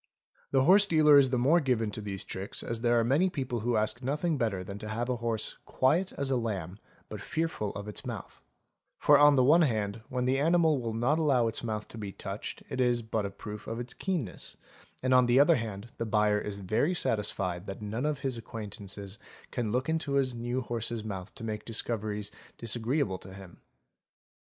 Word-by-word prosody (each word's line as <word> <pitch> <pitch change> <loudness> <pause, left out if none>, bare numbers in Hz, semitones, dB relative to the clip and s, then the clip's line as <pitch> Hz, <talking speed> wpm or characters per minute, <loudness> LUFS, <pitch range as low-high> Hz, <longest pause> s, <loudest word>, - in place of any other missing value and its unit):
The 135 -1 +3
horse 200 +6 +7
dealer 150 -4 +7
is 135 -2 +4
the 125 - +1
more 140 +8 +4
given 120 -7 0
to 110 - -5
these 100 -2 -4
tricks 95 +1 -6
as 115 -1 -4
there 120 0 +3
are - - +3
many 145 +11 +3
people 130 -7 -3
who 120 +2 0
ask 110 +3 -1
nothing 150 +5 0
better 110 -8 -1
than 100 +2 -7
to 110 - -7
have 120 +3 -2
a 125 - 0
horse 115 -2 -2
"quiet 165 +9 +1
as 140 -1 -2
a 130 - +3
lamb 100 -5 -3 0.3
but 105 -2 -7
fearful 160 -6 -2
of 100 0 -6
its 105 - -5
mouth - - -7 0.3
"'; - - -54
for 145 -1 +7
on 145 0 +7
the 130 - +4
one 155 +7 +6
hand 110 -6 0
when 125 -1 -1
the 130 +1 +2
animal 160 -2 +3
will 115 -2 -3
not 130 +8 +2
allow 135 -7 +3
its 115 - -4
mouth 110 -2 -3
to 115 - -9
be 100 -2 -5
touched 100 +2 -6
it 130 - -2
is 120 -1 +2
but 110 -2 -1
a - - -5
proof 105 +2 -9
of 115 +1 -4
its 120 +1 -6
keenness, 170 - -4 0.5
and 130 0 +2
on 125 -1 +6
the 120 +2 +5
other 150 +2 +6
hand, 110 -1 -6
the 115 - -1
buyer 105 -1 +3
is 105 -1 -4
very 110 - 0
satisfied 100 - 0
that 95 - -6
none 110 +7 -2
of 150 -2 -2
his 130 -4 -2
acquaintances 100 -2 -6 0.3
can 120 -4 -2
look 125 +3 0
into 160 -3 -1
his 135 -2 +2
new 120 +2 -2
horse's 115 -2 -3
mouth 95 -3 -6
to 130 - -9
make 110 -1 -4
discoveries 105 -2 -3 0.3
disagreeable 115 - -1
to 95 0 -11
him. 95 -3 -12
115 Hz, 210 wpm, -30 LUFS, 105-135 Hz, 0.5 s, horse